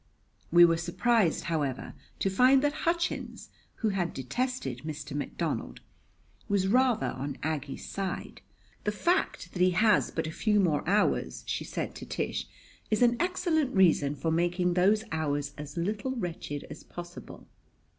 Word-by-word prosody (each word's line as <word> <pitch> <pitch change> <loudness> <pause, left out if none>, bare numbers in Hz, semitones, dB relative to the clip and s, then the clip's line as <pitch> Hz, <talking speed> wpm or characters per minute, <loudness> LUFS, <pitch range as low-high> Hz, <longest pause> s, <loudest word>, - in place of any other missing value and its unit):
We 175 +1 +9
were 165 -1 +3
surprised, 180 +2 +1
however, 145 -6 -2 0.2
to 195 - 0
find 255 +7 +5
that 290 0 +2 0.2
Hutchins, 340 0 -2 0.3
who 220 - 0
had 185 -4 -1
detested 135 - -2
Mr. 150 -1 -6
McDonald, 145 - -3 0.7
was 200 -2 +2
rather 250 +1 +3
on 135 +1 -5
Aggie's 145 -3 -3
side. 195 -2 -4 0.4
"The 210 - +1
fact 345 - 0
that 180 - -3
he 185 - +6
has 215 0 +4
but 160 - -2
a 160 - -4
few 210 +5 +2
more 165 -7 +2
hours," 205 +2 +1
she - - -2
said - - -4
to - - -8
Tish, - - -3 0.4
"is 215 +3 +3
an 240 0 +5
excellent 340 - +1
reason 160 -6 +4
for 160 +3 -1
making 175 +2 +1
those 200 +5 +3
hours 145 -2 -1
as 145 0 -8
little 210 +9 -1
wretched 170 - -4
as - - -9
possible." 175 0 -10
180 Hz, 150 wpm, -29 LUFS, 155-225 Hz, 0.7 s, We